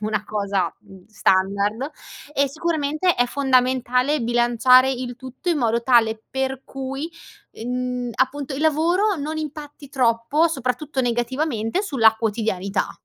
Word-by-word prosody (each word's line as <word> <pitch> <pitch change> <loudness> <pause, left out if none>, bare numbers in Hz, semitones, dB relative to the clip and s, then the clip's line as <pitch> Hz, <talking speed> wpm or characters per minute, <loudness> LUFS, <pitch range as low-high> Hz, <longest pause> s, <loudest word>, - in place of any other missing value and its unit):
una 215 0 -2
cosa, 200 -4 -1
mhmm, 190 -1 -16
standard, 200 +5 0 0.4
e 280 -1 +2
sicuramente 310 +3 0
è 245 - +2
fondamentale 255 +1 +1
bilanciare 240 +2 +4
il 250 -2 -4
tutto 260 +6 -8
in 325 - +1
modo 235 -2 +1
tale 225 -3 +3
per 265 0 -2
cui, 270 +4 -5 0.5
mhmm, 250 0 -3
appunto 270 +1 -1
il 275 - -4
lavoro 345 +7 +2
non 305 +1 -4
impatti 300 -2 -7
troppo, 255 +5 +2
soprattutto 270 0 -2
negativamente, 240 - -1
sulla 225 - +3
quotidianità. 205 -3 -1
255 Hz, 125 wpm, -22 LUFS, 230-285 Hz, 0.5 s, bilanciare